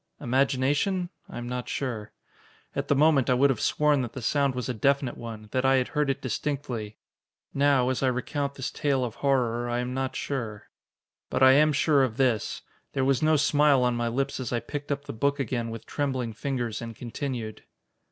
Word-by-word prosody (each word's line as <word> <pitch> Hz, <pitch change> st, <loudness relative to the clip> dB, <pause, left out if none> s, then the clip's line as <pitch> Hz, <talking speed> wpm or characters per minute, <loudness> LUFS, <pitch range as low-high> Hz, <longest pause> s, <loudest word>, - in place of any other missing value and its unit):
Imagination? 140 Hz, +8 st, +1 dB, 0.2 s
I -, -, -8 dB
am 120 Hz, 0 st, -5 dB
not 125 Hz, 0 st, -4 dB
sure. 120 Hz, -6 st, -3 dB, 0.6 s
At -, -, -2 dB
the 145 Hz, -, +3 dB
moment, 145 Hz, -3 st, +4 dB
I 125 Hz, -, +4 dB
would 135 Hz, +2 st, +4 dB
have 125 Hz, -, -3 dB
sworn 150 Hz, -2 st, +2 dB
that 120 Hz, -3 st, -4 dB
the 130 Hz, -, -6 dB
sound 140 Hz, +1 st, +1 dB
was 125 Hz, -3 st, -3 dB
a 125 Hz, -, -1 dB
definite 135 Hz, +2 st, +1 dB
one, 110 Hz, -2 st, -8 dB
that 130 Hz, -, 0 dB
I 135 Hz, 0 st, +4 dB
had 130 Hz, -1 st, +1 dB
heard 150 Hz, -2 st, 0 dB
it 135 Hz, -, -2 dB
distinctly. 125 Hz, -4 st, -3 dB, 0.6 s
Now, 140 Hz, -3 st, +3 dB
as 130 Hz, -, -1 dB
I 135 Hz, -, +2 dB
recount 140 Hz, +3 st, -2 dB
this 130 Hz, -, -4 dB
tale 140 Hz, -4 st, 0 dB
of 115 Hz, -, -5 dB
horror, 120 Hz, -4 st, +1 dB
I 120 Hz, -, 0 dB
am 125 Hz, +1 st, -2 dB
not 130 Hz, 0 st, -2 dB
sure. 115 Hz, -7 st, -4 dB, 0.6 s
But 130 Hz, -, +1 dB
I 130 Hz, -, +9 dB
am 150 Hz, +3 st, +5 dB
sure 145 Hz, 0 st, +3 dB
of 120 Hz, -3 st, -2 dB
this: 125 Hz, -6 st, 0 dB, 0.3 s
There 135 Hz, -1 st, +1 dB
was 135 Hz, -1 st, +2 dB
no 155 Hz, 0 st, +4 dB
smile 145 Hz, -2 st, +4 dB
on 125 Hz, 0 st, +2 dB
my 120 Hz, 0 st, -1 dB
lips 135 Hz, +4 st, -1 dB
as 130 Hz, -, -4 dB
I 120 Hz, -, +1 dB
picked 145 Hz, +5 st, -6 dB
up 140 Hz, 0 st, -2 dB
the -, -, -6 dB
book 140 Hz, +5 st, 0 dB
again 120 Hz, -2 st, -2 dB
with 115 Hz, 0 st, -7 dB
trembling 130 Hz, -5 st, -2 dB
fingers 120 Hz, -2 st, -3 dB
and 115 Hz, -1 st, -6 dB
continued. 120 Hz, -2 st, -5 dB
130 Hz, 205 wpm, -27 LUFS, 120-140 Hz, 0.6 s, I